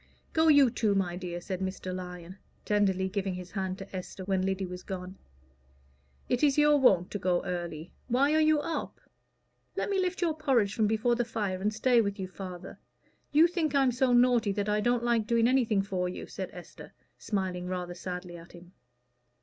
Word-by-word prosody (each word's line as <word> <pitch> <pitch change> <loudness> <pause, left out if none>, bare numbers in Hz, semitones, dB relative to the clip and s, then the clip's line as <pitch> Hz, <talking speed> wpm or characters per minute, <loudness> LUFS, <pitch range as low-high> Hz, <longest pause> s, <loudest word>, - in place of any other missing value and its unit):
"Go 320 0 +3
you 285 -5 +6
too, 215 -4 +1
my 180 -3 0
dear," 175 -1 -5
said 185 +1 -5
Mr. 185 -1 -4
Lyon, 180 0 -8 0.3
tenderly, 195 -3 +1
giving 190 -1 -2
his 180 0 -8
hand 190 -2 -3
to 195 0 -9
Esther, 185 +1 -7
when 190 -1 0
Lyddy 190 0 -1
was 180 0 -7
gone. 185 -1 -7 1.1
"It 250 - 0
is 290 -2 +3
your 295 0 +5
wont 185 -9 +4
to 205 - -3
go 180 -1 +1
early. 170 -2 -5
Why 270 +4 +2
are 315 - +4
you 310 -1 +4
up?" 330 - -4 0.8
"Let - - -2
me 390 - +1
lift 370 0 -1
your 330 -2 +2
porridge 260 -10 +1
from 220 -3 +2
before 220 +3 +1
the 240 0 +1
fire, 205 -5 -3
and 210 +2 +1
stay 235 +2 +3
with 200 -1 -3
you, 190 - -3
father. 185 -1 -9 0.5
You 310 +3 +6
think 335 -4 -1
I'm 270 -2 +4
so 250 +1 +1
naughty 240 -3 +4
that 205 0 -2
I 210 0 +1
don't 240 +1 +1
like 235 -3 +1
doing 235 -1 +3
anything 235 -6 +2
for 185 -2 -2
you," 180 - -6
said - - -6
Esther, - - -12 0.3
smiling 185 -3 -3
rather 180 -1 -4
sadly 180 0 -6
at 165 0 -14
him. 175 0 -14
200 Hz, 195 wpm, -29 LUFS, 185-245 Hz, 1.1 s, you